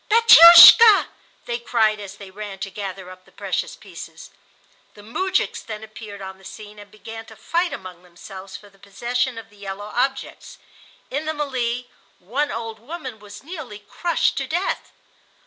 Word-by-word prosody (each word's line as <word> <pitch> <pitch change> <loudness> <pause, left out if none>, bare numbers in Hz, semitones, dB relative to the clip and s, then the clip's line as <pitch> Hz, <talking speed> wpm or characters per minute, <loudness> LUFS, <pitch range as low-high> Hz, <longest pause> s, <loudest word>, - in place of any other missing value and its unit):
"Batiushka," 430 0 +9 0.4
they 235 0 -4
cried 220 -3 0
as 200 -1 -9
they 195 -2 -12
ran 205 0 -8
to 195 +1 -7
gather 190 -2 -8
up 185 0 -15
the - - -24
precious - - -4
pieces. - - -12 0.6
The 205 - -15
moujiks 375 - -2
then 215 -1 -8
appeared 215 -2 -11
on 190 0 -10
the - - -21
scene 210 +2 -12
and 205 0 -14
began 225 +1 -11
to 220 - -14
fight 340 - -2
among 185 -2 -9
themselves 190 +2 -12
for 205 - -18
the 195 -1 -24
possession 240 +5 -3
of 225 -1 -11
the 205 - -21
yellow 200 +1 -8
objects. 265 +2 -4 0.5
In 290 +3 -3
the 315 - -2
mêlée 250 -5 -3 0.3
one 265 +11 -3
old 225 -1 -6
woman 260 -2 -9
was 205 +1 -13
nearly 305 - -9
crushed 330 +11 -2
to 270 - -3
death. 350 +6 -3
220 Hz, 165 wpm, -21 LUFS, 200-270 Hz, 0.6 s, Batiushka